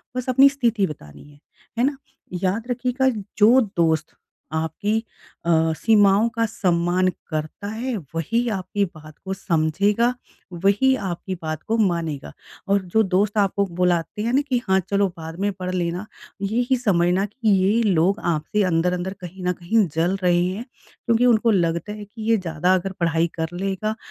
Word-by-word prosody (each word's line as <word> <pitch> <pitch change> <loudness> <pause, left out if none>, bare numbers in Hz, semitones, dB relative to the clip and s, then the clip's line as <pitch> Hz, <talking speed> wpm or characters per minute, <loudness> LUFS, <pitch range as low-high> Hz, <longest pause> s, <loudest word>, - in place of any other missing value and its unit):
बस 255 0 -3
अपनी 270 +2 +7
स्थिति 235 -8 +1
बतानी 75 - -11
है। 145 - -20 0.4
है 240 - +2
ना? 275 +1 +1 0.5
याद 205 +5 0
रखिएगा 250 +2 +1 0.3
जो 225 +5 +6 0.2
दोस्त 160 -2 +1 0.4
आपकी 160 +7 -1 0.5
अ, 170 - -1 0.3
सीमाओं 210 -1 +4
का 230 0 +2
सम्मान 180 -3 +1 0.2
करता 155 +5 -4
है, 235 +4 -3 0.2
वही 230 +9 0
आपकी 200 0 -1
बात 155 -3 -13
को 190 - -2
समझेगा, 190 +6 +1 0.6
वही 205 +7 +4
आपकी 180 +2 -4
बात 155 -1 -4
को 225 - +1
मानेगा। 170 -8 -1 0.4
और 200 0 +2
जो 220 - +5
दोस्त 200 +2 +1
आपको 200 0 +2
बुलाते 180 +2 -1
हैं 230 +3 -1
ना 275 - +4
कि 245 -2 +1
हाँ, 190 0 +4
चलो 200 +2 +1
बाद 165 +1 -8
में 205 +1 +1
पढ़ 185 -1 -5
लेना, 175 +2 -2 0.4
यही 240 +6 +1
समझना 185 -4 +2
कि 220 +2 -2
ये 200 +5 +2
लोग 195 0 +2
आपसे 160 +7 -1
अंदर-अंदर 180 +3 0
कहीं 180 +1 -9
न 180 - +2
कहीं 185 +3 +1
जल 170 +4 +1
रहे 175 -1 +3
हैं। 190 +6 -4 0.4
क्योंकि 235 0 +3
उनको 230 -1 +4
लगता 170 0 0
है 210 -1 -8
कि 215 +3 -12
ये 225 - +5
ज़्यादा 175 0 0
अगर 185 +1 -2
पढ़ाई 165 0 +2
कर 160 - 0
लेगा, 195 +3 -2
195 Hz, 165 wpm, -22 LUFS, 170-220 Hz, 0.6 s, अपनी